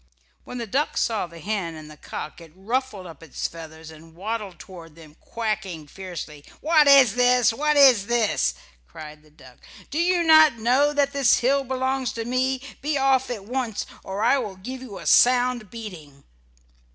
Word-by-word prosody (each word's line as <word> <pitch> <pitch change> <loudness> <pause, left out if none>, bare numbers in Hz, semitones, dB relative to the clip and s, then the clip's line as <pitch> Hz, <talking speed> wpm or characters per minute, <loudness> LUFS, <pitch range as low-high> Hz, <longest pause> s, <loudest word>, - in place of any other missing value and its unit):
When 250 - -8
the 235 - -4
duck 275 +8 -2
saw 220 -5 0
the 170 0 -14
hen 175 -2 -4
and 155 -1 -11
the 155 - -13
cock 155 +2 -8
it 165 -2 -14
ruffled 220 0 -3
up 165 -4 -12
its 160 -5 -5
feathers 160 -1 -11
and 160 +1 -16
waddled 205 -1 -5
toward 165 -3 -13
them, 155 -2 -16
quacking 215 -8 -4
fiercely. 165 -4 -9 0.2
"What 310 -1 +3
is 275 -6 +7
this! 245 -1 +3
What 300 +4 0
is 250 -8 +6
this!" 215 - +1 0.3
cried 150 - -11
the 155 - -23
duck. 130 -4 -18 0.3
"Do 300 - -2
you 350 0 +2
not 315 -5 +6
know 255 +6 +2
that 285 -1 0
this 275 -3 +3
hill 275 +3 +2
belongs 260 0 -2
to 230 -1 -5
me? 255 +2 -1 0.2
Be 290 +1 -1
off 270 -1 +2
at 215 -5 -6
once 245 -2 -3 0.2
or 195 +2 -4
I 260 +4 +3
will 210 -6 -5
give 255 +8 -8
you 225 -7 -9
a - - -10
sound 245 -3 +3
beating." 170 -12 -10
225 Hz, 180 wpm, -23 LUFS, 170-260 Hz, 0.3 s, is